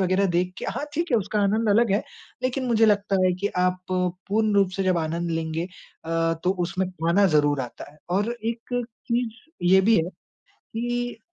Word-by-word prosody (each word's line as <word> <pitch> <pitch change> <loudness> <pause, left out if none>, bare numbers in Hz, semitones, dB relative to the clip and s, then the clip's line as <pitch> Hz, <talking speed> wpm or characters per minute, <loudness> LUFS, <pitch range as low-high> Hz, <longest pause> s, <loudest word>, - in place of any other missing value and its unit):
वग़ैरह 190 +1 +2
देख 180 +1 +1
के - - -6
हाँ, 290 - -3
ठीक 335 +2 -1
है - - +6
उसका 210 +1 -1
आनंद 215 +3 +2
अलग 225 +1 +4
है 205 - +2 0.4
लेकिन 255 +1 -1
मुझे 225 -2 +4
लगता 205 -1 +2
है 185 - +3
कि 205 - +1
आप 180 0 +1
पूर्ण 190 +4 0
रूप 200 -2 +4
से 195 - 0
जब 185 -2 +2
आनंद 170 +2 -2
लेंगे 165 0 -2 0.4
अ, 165 0 +1
तो 180 - +3
उसमें 185 +2 -2
खाना 180 +3 +2
ज़रूर 145 -3 +3
आता 125 +2 -7
है। 150 - -22
और 205 +6 +1
एक 235 +2 -2 0.3
चीज़ 240 - -3
ये 190 - +8
भी 220 +3 +4
है 165 +1 +1 0.5
कि 240 +1 -4
195 Hz, 190 wpm, -25 LUFS, 175-225 Hz, 0.5 s, ये